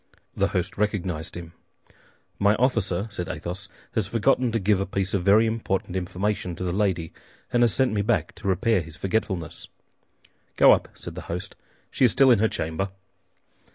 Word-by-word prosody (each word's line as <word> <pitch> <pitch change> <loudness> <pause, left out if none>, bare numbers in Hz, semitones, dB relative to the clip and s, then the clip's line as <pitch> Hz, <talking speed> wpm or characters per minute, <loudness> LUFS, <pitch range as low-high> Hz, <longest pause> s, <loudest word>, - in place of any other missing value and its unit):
The - - +2
host 90 +2 -3
recognized 90 -7 -2
him. 85 -1 -9 0.9
"My 100 +1 +4
officer," 110 -7 +1
said 90 -4 -4
Athos, 95 +4 -5 0.2
"has 110 -5 0
forgotten 120 +3 +2
to 115 - +1
give 100 0 +2
a 100 - -2
piece 95 0 -2
of 95 -3 0
very 105 +4 +5
important 110 -5 -2
information 95 0 -2
to 90 - -5
the 90 - -1
lady, 95 -5 0 0.4
and 120 - +3
has 120 -2 +5
sent 130 -1 +2
me 105 - +1
back 110 +2 0
to 105 - -6
repair 95 +2 +2
his 80 0 -9
forgetfulness." 95 -4 -2 0.9
"Go - - +7
up," - - +3
said - - -8
the - - -7
host; 90 +3 -5 0.4
"she - - 0
is 120 - +4
still 135 +2 +5
in 115 - +5
her 110 +1 +3
chamber." 80 +5 -2
100 Hz, 180 wpm, -25 LUFS, 90-110 Hz, 0.9 s, Go